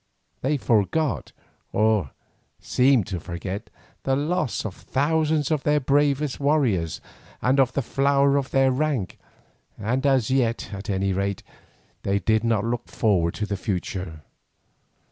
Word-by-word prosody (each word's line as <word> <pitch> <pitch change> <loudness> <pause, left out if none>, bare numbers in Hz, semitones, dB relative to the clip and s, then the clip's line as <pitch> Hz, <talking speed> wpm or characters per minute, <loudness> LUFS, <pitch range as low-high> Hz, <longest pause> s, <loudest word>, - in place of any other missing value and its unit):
They 145 +3 +1
forgot, 120 - 0 0.4
or 105 -8 +2 0.5
seemed 130 -4 +3
to 90 -1 -4
forget, 90 +5 -6 0.3
the 135 - +1
loss 150 -3 -1
of 105 - -3
thousands 155 - 0
of 155 -3 +1
their 150 +1 +2
bravest 145 0 +1
warriors 130 - +1 0.4
and 130 +3 +2
of 130 -2 +3
the 140 - 0
flower 140 +2 +2
of 140 -1 0
their 135 -1 +3
rank, 130 -8 -1 0.6
and 120 +6 -1
as 130 -4 +2
yet, 120 -4 0
at 100 +1 -7
any 95 -1 0
rate, 100 0 -2 0.6
they 100 0 0
did 110 +3 +1
not 115 -2 +1
look 120 +1 -2
forward 90 -7 +1
to 105 - -2
the 100 -1 -3
future. 90 -4 -4
120 Hz, 140 wpm, -24 LUFS, 100-140 Hz, 0.6 s, seemed